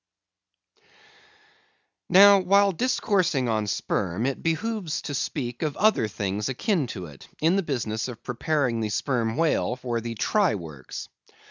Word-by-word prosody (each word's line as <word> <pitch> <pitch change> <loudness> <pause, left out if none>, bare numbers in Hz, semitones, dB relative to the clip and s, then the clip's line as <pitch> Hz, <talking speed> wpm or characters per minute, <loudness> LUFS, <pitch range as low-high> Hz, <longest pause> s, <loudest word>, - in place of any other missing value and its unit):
Now, 200 +1 +8
while 200 +2 +4
discoursing 185 - +1
of 110 -2 0
sperm, 95 +3 -1
it 135 0 -2
behooves 175 0 -2
to 145 - -5
speak 125 -3 -3
of 150 -2 -2
other 215 - +3
things 105 +2 -3
akin 160 - 0
to 95 -6 -6
it, 75 -4 -13
in 165 +4 +3
the 195 - +2
business 120 - -2
of 120 -2 -9
preparing 125 -1 -1
the 110 -1 -2
sperm 115 +1 -1
whale 160 -6 +1
for 120 -2 -3
the 115 0 -5
try 200 - +2
works. 75 -8 -8
130 Hz, 140 wpm, -25 LUFS, 110-180 Hz, -, Now